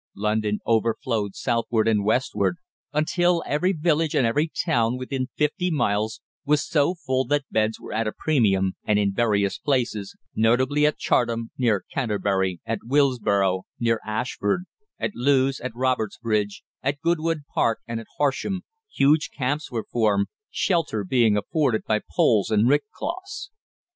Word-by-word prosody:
London 105 0 0
overflowed 115 -2 0
southward 115 -2 0
and 105 -2 +2
westward 125 - +1 0.3
until 170 +3 +2
every 175 +6 +1
village 160 -2 +1
and 130 - +3
every 150 +8 +1
town 120 -7 +1
within 130 0 -3
fifty 180 +5 +1
miles 110 -8 0 0.2
was 150 0 +1
so 160 +2 +2
full 130 -5 -1
that 145 +3 +1
beds 110 0 +1
were - - -8
at 110 +1 0
a - - 0
premium, 100 -12 +1
and 105 - +2
in 100 -1 +1
various 100 -3 +1
places, 120 -8 -1 0.2
notably 130 +7 +3
at 150 - -1
Chartham, 115 -1 0
near 115 -6 +1
Canterbury, 100 -7 0
at 115 -1 -2
Willesborough, 105 -9 +2
near 115 -1 +1
Ashford, 110 - -1 0.3
at - - -2
Lewes, 135 +1 +2
at 130 -2 -6
Robertsbridge, 110 -4 -1 0.2
at 140 +2 -1
Goodwood 165 -1 0
Park, 115 - +2
and 115 -1 -3
at 115 - -10
Horsham, 145 +7 0 0.3
huge 150 +3 +3
camps 145 +3 -2
were 115 -3 -3
formed, 105 -4 +2 0.2
shelter 165 - 0
being 110 +1 +3
afforded 125 +1 0
by 110 -1 +1 0.2
poles 105 -4 +3
and 110 +1 +3
rick 145 +6 +3
cloths. 390 +6 -6
120 Hz, 145 wpm, -24 LUFS, 110-150 Hz, 0.3 s, and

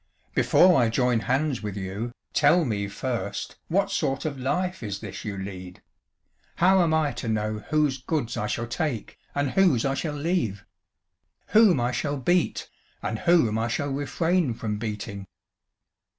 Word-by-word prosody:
"Before 180 -7 +5
I 115 - +3
join 125 0 +2
hands 135 +3 0
with 105 -2 -5
you, 100 +5 -4 0.2
tell 155 +3 +4
me 100 -5 -1
first 105 0 -4
what 195 +3 +1
sort 140 -7 -1
of 140 -3 -3
life 180 +8 -1
is 100 -3 -4
this 105 -3 -7
you 100 -2 -4
lead? 95 -2 -8 0.7
How 185 +2 +5
am 170 -2 +2
I 160 -2 +2
to 120 -1 -6
know 110 -1 -1
whose 150 -3 +2
goods 135 -5 -2
I 105 - -2
shall 115 - -2
take, 120 -1 -3 0.2
and 145 -2 0
whose 175 -12 +3
I 135 - +1
shall 150 +2 -3
leave? 145 - -1 0.8
Whom 210 - +6
I 120 +1 +1
shall 140 +3 -2
beat, 175 +7 +1 0.4
and 110 - -2
whom 160 -11 +3
I 115 - 0
shall 140 +4 -2
refrain 145 +1 0
from 105 -2 -3
beating?" 105 -2 -5
130 Hz, 160 wpm, -26 LUFS, 110-160 Hz, 0.8 s, Whom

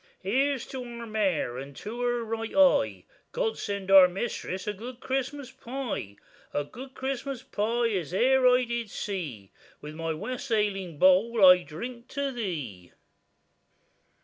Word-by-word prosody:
Here's 265 +6 +1
to 260 -1 -5
our 235 -1 -7
mare, 195 - 0
and 140 +1 -9
to 230 - -6
her 240 -1 0
right 225 0 -4
eye, 285 -2 +4 0.3
God 480 -2 -1
send 200 -2 -3
our 190 -2 +10
mistress 190 -1 -4
a 210 - -2
good 240 +5 -9
Christmas 270 +1 -3
pie; 255 - -5 0.4
A 145 - +1
good 255 - -11
Christmas 265 -1 -4
pie 230 +3 0
as 180 -8 -2
e'er 255 +6 +4
I 250 0 +5
did 235 -2 -3
see,— 155 - -5 0.3
With 150 +1 -8
my 165 +1 -3
wassailing 210 - -2
bowl 190 +5 +5
I 180 -1 +8
drink 235 - -8
to 280 -1 -1
thee. 150 - -5
225 Hz, 145 wpm, -28 LUFS, 185-255 Hz, 0.4 s, our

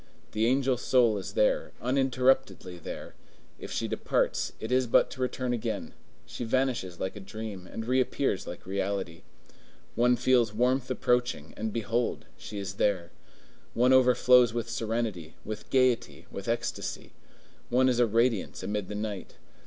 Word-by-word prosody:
The 110 +1 +1
angel 130 0 +2
soul 120 -4 +3
is - - -7
there, - - +1
uninterruptedly 130 -7 +1
there; - - -7 0.5
if - - -8
she - - -1
departs, - - 0
it 110 - -5
is 130 0 +3
but - - +4
to 130 - -7
return 125 -1 -1
again; 115 - -3 0.3
she - - -6
vanishes 115 -7 -1
like 95 +2 -3
a - - -7
dream, 100 -2 -7
and 115 - -5
reappears 130 -2 0
like 90 - -8
reality. 95 -3 -3 0.7
One 125 +1 +4
feels 120 -3 +2
warmth 125 +2 +1
approaching, 125 - 0
and 110 0 -3
behold! 115 +2 -1
she 105 - -8
is 100 0 -5
there. 90 -5 +1 0.6
One 125 +2 +4
overflows 125 -2 +5
with 115 -1 -2
serenity, 110 -8 -3
with 110 0 -6
gayety, 130 -2 +1
with - - -7
ecstasy; - - -3 0.6
one 130 +1 +4
is 125 -2 +2
a 120 - +5
radiance 115 -1 +1
amid 105 -2 -2
the 105 - -4
night. 105 -2 -5
115 Hz, 150 wpm, -28 LUFS, 105-125 Hz, 0.7 s, overflows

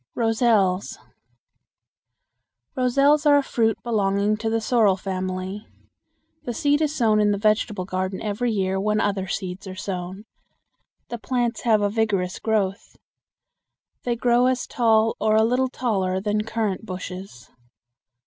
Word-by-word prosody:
Roselles. 220 -5 +1 1.8
Roselles 275 +4 +3
are 290 -1 +6
a 285 - +2
fruit 225 -4 0
belonging 205 -2 +1
to 225 +1 -2
the 225 0 0
sorrel 220 -4 +2
family. 185 +1 -4 0.8
The 240 - -4
seed 290 +4 +2
is 305 -1 0
sown 215 -5 +3
in 210 - +3
the 205 - +1
vegetable 210 -2 0
garden 185 0 -3
every 220 +3 -2
year 190 -2 -1
when 210 +2 0
other 195 -2 -1
seeds 190 0 -5
are 185 - -7
sown. 185 0 -5 0.9
The 235 - -5
plants 240 -1 -1
have 215 -3 +3
a 205 - +2
vigorous 200 -4 -1
growth. 200 -3 -2 1.0
They 240 -1 -1
grow 240 +1 +3
as 255 -1 0
tall 225 -2 +2
or 215 0 +2
a 220 - +5
little 250 +3 +1
taller 190 -8 -1
than 210 +1 -1
currant 220 -3 -2
bushes. 185 - -8
215 Hz, 140 wpm, -23 LUFS, 190-235 Hz, 1.8 s, are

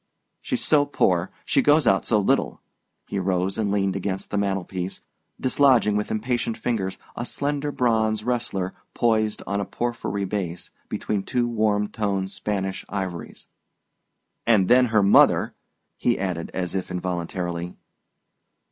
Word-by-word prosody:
"She's 255 -3 -2
so 145 -2 +4
poor! 90 -10 +1 0.2
She - - +3
goes 150 0 +4
out 95 -3 +3
so 110 - +3
little." 100 - +1 0.5
He 100 - -3
rose 95 0 0
and 105 -2 0
leaned 100 -2 +1
against 95 0 -3
the 105 - 0
mantel 95 -2 0
piece, 90 0 -5 0.4
dislodging 130 -5 +4
with 105 0 -1
impatient 115 +1 -1
fingers 95 -6 -2 0.2
a 120 - -3
slender 145 +3 -2
bronze 110 -4 +1
wrestler 115 -6 -1 0.2
poised 110 -2 +1
on 100 +1 -1
a - - 0
porphyry 115 -3 -3
base, 90 -3 -4 0.2
between 105 -2 -2
two 120 +4 0
warm 105 -3 +1
toned 100 -3 -2
Spanish 95 -2 -3
ivories. 95 -4 -5 1.0
"And 105 -5 +4
then 125 +1 +6
her 110 -3 +3
mother 100 - +5 0.2
" - - -52
he 120 - +2
added, 90 -4 -3
as 90 -1 -3
if 95 -2 -3
involuntarily. 90 -1 -3
100 Hz, 145 wpm, -24 LUFS, 95-120 Hz, 1.0 s, then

